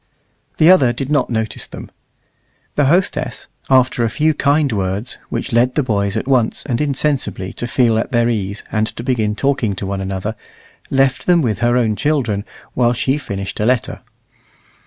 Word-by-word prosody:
The 155 - +5
other 135 -10 +5
did 135 +3 -4
not 145 -4 +2
notice 110 -2 -3
them. - - -10 0.8
The 145 - +2
hostess, 175 +7 0 0.2
after 130 -1 +3
a 115 - +1
few 155 +7 +1
kind 145 -1 +2
words, 100 +2 -2
which 135 - -3
led 120 +2 +3
the 150 - +2
boys 100 -5 0
at - - -3
once 125 -5 +1
and 125 -2 -1
insensibly 140 -9 -1
to 120 - -3
feel 115 -2 +2
at - - -3
their 120 -1 +2
ease 100 -3 -2
and 110 0 +1
to 115 - -7
begin 110 -5 0
talking 130 -6 0
to 95 - -5
one 95 0 -3
another, 95 +3 -3 0.5
left 135 -1 +1
them 175 -3 +4
with 110 -6 -1
her 120 +1 +2
own 110 -3 +1
children 120 -8 0 0.3
while 120 -1 +2
she 135 +4 0
finished 100 -7 -5
a 105 - +1
letter. 125 -1 0
120 Hz, 180 wpm, -18 LUFS, 105-135 Hz, 0.8 s, The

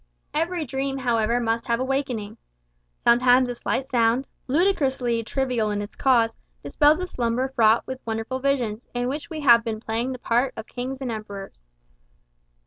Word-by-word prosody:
Every 330 +1 -1
dream, 270 +1 -2
however, 235 -2 +1
must 230 -1 -1
have 235 0 +1
a - - 0
waking. 250 -6 -2 0.7
Sometimes 250 +1 +5
a - - -2
slight 260 +2 -2
sound, 240 0 +2 0.2
ludicrously 265 -7 +1
trivial 250 -3 -1
in 205 -1 -1
its 205 +1 -6
cause, 235 -4 +3 0.3
dispels 300 +1 +3
a 365 - -2
slumber 250 -4 -1
fraught 225 -3 +3
with 260 0 -6
wondrous 225 +3 -3
visions, 250 -5 -1
in 245 0 0
which 300 +5 -5
we 315 -2 -5
have 235 -5 +6
been 225 -2 -3
playing 230 +3 -2
the - - -6
part 245 +2 0
of 220 - -6
kings 260 +2 -6
and 255 -3 -2
emperors. 200 - -7
245 Hz, 165 wpm, -24 LUFS, 230-270 Hz, 0.7 s, have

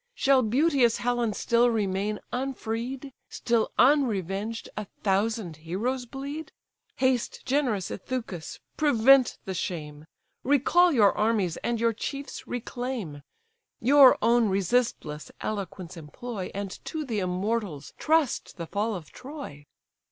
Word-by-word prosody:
Shall 270 - +4
beauteous 255 0 +3
Helen 240 -2 0
still 235 +3 +3
remain 210 -1 -1
unfreed, 255 +1 -4 0.2
Still 235 -2 0
unrevenged, 225 - +2
a 210 - -4 0.2
thousand 200 -3 0
heroes 225 +11 -3
bleed! 280 +5 -6 0.4
Haste, 260 -2 0
generous 250 -9 0
Ithacus! 205 -7 -5 0.2
prevent 270 -3 +5
the 190 - -3
shame, 155 -4 -5 0.4
Recall 315 +6 +4
your 215 -8 +4
armies, 210 -6 +1
and 235 -1 -2
your 230 0 +2
chiefs 275 +5 -6
reclaim. 245 - -4 0.6
Your 270 +2 +7
own 235 -2 +4
resistless 190 -6 0
eloquence 190 -4 -5
employ, 185 +6 -6
And 200 -1 -5
to 315 -2 -4
the 225 -5 -2
immortals 185 -3 -2
trust 315 -9 +1
the 170 - -4
fall 210 +5 -1
of 170 -4 -9
Troy." 255 - -9
230 Hz, 115 wpm, -27 LUFS, 195-260 Hz, 0.6 s, Your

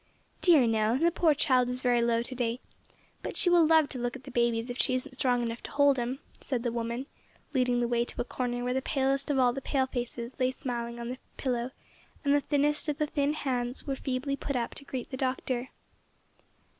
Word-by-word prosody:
"Dear 320 -8 +6
no, 225 +1 +2
the 335 +4 +3
poor 320 -3 +3
child 255 -3 +3
is 250 0 -4
very 245 -1 +3
low 235 0 +2
to 255 - -6
day. 240 -1 -1 0.6
But - - -4
she 355 - +4
will 340 -2 +6
love 320 -2 +5
to 255 - -6
look 240 +1 -2
at 265 - -10
the 270 - -9
babies 235 0 +1
if 245 - -7
she 255 - +3
isn't 260 +2 -2
strong 245 -1 +1
enough 230 0 -3
to - - -7
hold 285 -2 +4
'em," 245 +2 -2 0.2
said 250 -4 -2
the 240 - 0
woman, 235 +2 -3 0.5
leading 250 -2 +2
the 240 - +1
way 235 0 +2
to - - -10
a - - +2
corner 245 -1 -3
where 250 0 0
the 265 - 0
palest 270 0 0
of 285 - +1
all 250 -2 +4
the 270 - -4
pale 270 -1 +1
faces 245 -1 -5
lay 255 0 +3
smiling 235 -2 -4
on 235 0 -4
the 255 +1 -5 0.2
pillow, 245 -2 -1 0.6
and 280 - +4
the 290 - +4
thinnest 295 +2 +1
of 290 - -1
the 305 - +1
thin 290 0 0
hands 250 -4 -2
were 275 - -1
feebly 270 +1 -2
put 280 0 -4
up 235 -2 -1
to 280 - -9
greet 260 -2 -5
the 260 - -4
Doctor. 255 -1 -1
255 Hz, 230 wpm, -29 LUFS, 240-275 Hz, 0.6 s, Dear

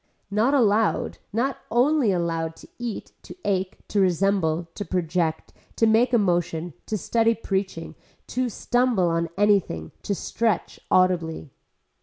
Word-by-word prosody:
Not 225 +7 +3
allowed, 220 -4 +2
not 250 +5 -1
only 255 -1 +3
allowed 165 -2 -1
to - - -14
eat, 240 -3 -5
to - - -11
ache, 190 -1 -1
to 205 - +1
resemble, 175 -3 +1
to 205 - -5
project, 170 -2 -1 0.2
to 225 - +3
make 225 +3 +4
a 240 - +5
motion, 175 -4 0
to 215 - -1
study 230 +3 +2
preaching, 195 -3 -3 0.3
to 255 0 -1
stumble 240 -5 +1
on 165 0 0
anything, 195 - +2
to 200 - -2
stretch 220 0 -1
audibly. 170 -5 +1
195 Hz, 135 wpm, -24 LUFS, 170-225 Hz, 0.3 s, a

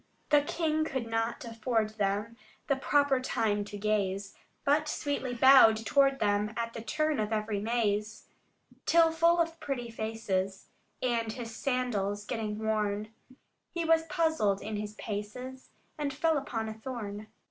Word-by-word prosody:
The 295 -1 +6
king 310 +1 0
could 265 -6 -2
not 225 +2 -2
afford 225 -1 -1
them 205 +3 0 0.3
The 275 - +2
proper 280 0 +2
time 210 -5 0
to 205 0 -7
gaze, 200 -1 -1 0.3
But 295 +2 +3
sweetly 285 -4 -2
bowed 255 -3 +8
toward 275 +1 +4
them, 210 -1 0
At 230 0 -2
the 230 - -6
turn 305 +5 0
of 215 0 -1
every 215 -1 -1
maze: 215 -1 -1 0.6
Till 330 -1 +5
full 335 +1 +4
of 330 -1 0
pretty 245 -4 -4
faces, 215 -4 -3 0.3
and 230 -3 0
his 225 -1 -7
sandals 210 -7 -1
getting 215 -2 -3
worn, 215 -1 -1 0.6
He 340 -1 -3
was 325 0 +3
puzzled 315 - +1
in 215 +1 -5
his 210 0 -5
paces, 240 +6 -6 0.3
and 290 -1 -1
fell 315 +4 +1
upon 240 -6 -2
a 220 - -4
thorn. 220 -3 -6
230 Hz, 145 wpm, -30 LUFS, 210-275 Hz, 0.6 s, bowed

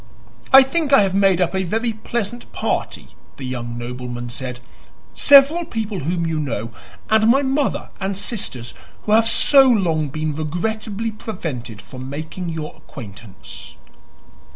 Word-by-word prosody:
"I 270 0 +10
think 295 +2 -1
I 275 -7 +7
have 190 -1 -1
made 195 -2 +3
up 175 -1 +1
a 190 - 0
very 225 +6 -1
pleasant 235 +1 -4
party," - - -3 0.3
the 135 - -7
young 120 -2 -5
nobleman 120 0 -6
said. 125 -1 -6 0.5
"Several 285 - +6
people 220 - -4
whom 170 +3 -1
you 160 -1 -1
know, 115 -6 -3 0.4
and 220 0 +4
my 270 +4 +4
mother 270 +1 -1
and 190 0 -3
sisters, 190 - -2 0.3
who 210 - -3
have 225 +1 +5
so 270 +3 +6
long 165 - +1
been 155 +2 -3
regrettably 205 +8 -3
prevented 160 - -6
from 130 0 -9
making 155 +5 -5
your 160 -2 -5
acquaintance." 110 -5 -11
180 Hz, 145 wpm, -20 LUFS, -, 0.5 s, I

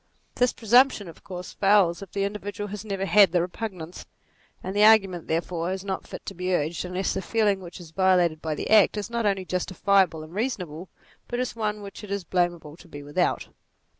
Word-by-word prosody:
This 250 0 +2
presumption 240 -2 +3
of 165 - -13
course 180 -1 -8
fails 195 -4 +3
if 195 - -10
the 200 - -1
individual 205 0 -4 0.2
never 195 -2 -2
had 205 0 +6
the 180 - +2
repugnance: 180 -1 -5 0.6
and 190 +2 -5
the 205 - +4
argument, 195 -6 +5
therefore, 170 +1 -2
is 190 0 -4
not 190 -1 -4
fit - - -9
to - - -6
be 180 0 -1
urged 160 +1 -2
unless 180 +1 -2
the - - -2
feeling 210 -2 +1
which 180 -1 -10
is 170 -3 -12
violated 180 -3 +2
by 155 -1 -2
the - - -5
act, 215 -1 +5
is 210 +2 -4
not 235 -2 0
only 195 -2 0
justi 180 +1 -3
fiable 190 -4 +2
and 155 +2 -12
reasonable, 185 - -4 0.4
bat 240 - -3
is 250 -1 -2
one 210 -2 -2
which 200 +1 -9
it 210 - -9
is 200 -1 -2
blamable 175 -3 -1
to - - -15
be 145 -3 -9
without. 145 +5 -1
190 Hz, 205 wpm, -25 LUFS, 175-205 Hz, 0.6 s, had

